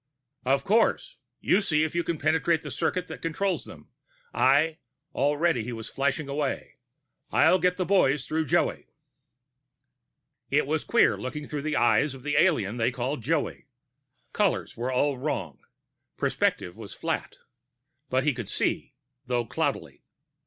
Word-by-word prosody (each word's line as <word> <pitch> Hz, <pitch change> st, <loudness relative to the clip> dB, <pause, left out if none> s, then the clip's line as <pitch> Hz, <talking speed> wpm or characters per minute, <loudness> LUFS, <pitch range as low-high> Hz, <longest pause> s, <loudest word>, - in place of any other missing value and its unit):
"Of 135 Hz, +1 st, +2 dB
course. 230 Hz, -, +2 dB, 0.2 s
You 200 Hz, -, +3 dB
see 155 Hz, -6 st, +1 dB
if 160 Hz, -, -2 dB
you 170 Hz, 0 st, 0 dB
can 170 Hz, -1 st, -2 dB
penetrate 160 Hz, +2 st, +1 dB
the -, -, -6 dB
circuit 175 Hz, +2 st, -1 dB
that -, -, -8 dB
controls 185 Hz, +4 st, -1 dB
them. -, -, -13 dB, 0.4 s
I 155 Hz, +5 st, +3 dB, 0.2 s
" -, -, -52 dB
already 145 Hz, -1 st, +1 dB
he 120 Hz, +2 st, -5 dB
was 110 Hz, -1 st, -7 dB
flashing 140 Hz, +2 st, -1 dB
away 140 Hz, 0 st, -3 dB, 0.5 s
"I'll 160 Hz, +6 st, +5 dB
get 180 Hz, 0 st, +3 dB
to -, -, -22 dB
the 185 Hz, -, 0 dB
boys 150 Hz, -8 st, +3 dB
through 160 Hz, 0 st, -1 dB
Joey." -, -, +1 dB, 1.6 s
It -, -, +2 dB
was -, -, -1 dB
queer, -, -, +4 dB
looking 145 Hz, +4 st, -5 dB
through 150 Hz, -1 st, -4 dB
the 155 Hz, +1 st, -2 dB
eyes 130 Hz, +4 st, +3 dB
of 130 Hz, -, -12 dB
the 145 Hz, +1 st, -1 dB
alien 120 Hz, -, +2 dB
they 115 Hz, 0 st, +2 dB
called 125 Hz, +2 st, -3 dB
Joey; 145 Hz, +2 st, -2 dB, 0.7 s
colors 205 Hz, -4 st, 0 dB
were 120 Hz, +2 st, -2 dB
all 135 Hz, +1 st, +1 dB
wrong, 95 Hz, -, -3 dB, 0.6 s
perspective 90 Hz, -, 0 dB
was 105 Hz, -3 st, -9 dB
flat. -, -, -3 dB, 0.7 s
But 130 Hz, +1 st, +1 dB
he 150 Hz, 0 st, +2 dB
could 120 Hz, -4 st, -6 dB
see, -, -, -1 dB, 0.3 s
though 120 Hz, -1 st, 0 dB
cloudily. -, -, -3 dB
145 Hz, 155 wpm, -27 LUFS, 125-165 Hz, 1.6 s, I'll